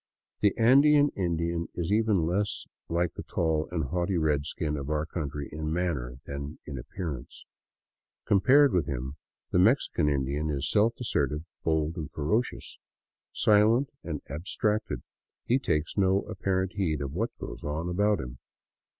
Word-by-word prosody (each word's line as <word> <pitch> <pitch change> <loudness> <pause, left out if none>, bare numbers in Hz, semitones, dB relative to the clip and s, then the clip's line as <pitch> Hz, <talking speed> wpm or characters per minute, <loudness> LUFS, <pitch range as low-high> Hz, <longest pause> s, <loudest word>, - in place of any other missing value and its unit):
The 105 -2 +2
Andean 145 +5 +6
Indian 85 -3 -1
is 85 +1 -2
even 105 -5 +3
less 100 +5 -1 0.2
like 85 0 +1
the - - -6
tall 80 -2 -1
and 85 -3 -1
haughty 90 +5 -1
redskin 75 0 0
of 70 -1 -5
our 75 0 0
country 75 -4 -4
in 75 +1 -3
manner 75 -8 -2
than 70 +2 -6
in 70 -4 -6
appearance. 80 -1 -6 0.8
Compared 135 +8 +5
with 90 -3 +1
him, 65 +1 -4 0.3
the - - +3
Mexican 95 - +3
Indian 70 +2 -1
is 70 -2 -1
self 110 +3 +3
assertive, 75 - -1 0.2
bold, 80 0 0
and 75 -3 -4
ferocious. 105 +11 -2 0.5
Silent 110 +6 +4
and 75 -4 -5
ab 75 +5 -6
stracted, 105 0 -1 0.4
he 125 +3 +3
takes 80 - -1
no 95 0 +3
apparent 95 -2 -1
heed 85 -7 0
of 70 -1 -4
what 110 +8 -2
goes - - -8
on 75 +3 -2
about 100 +4 +2
him. - - -7
85 Hz, 150 wpm, -28 LUFS, 75-100 Hz, 0.8 s, Andean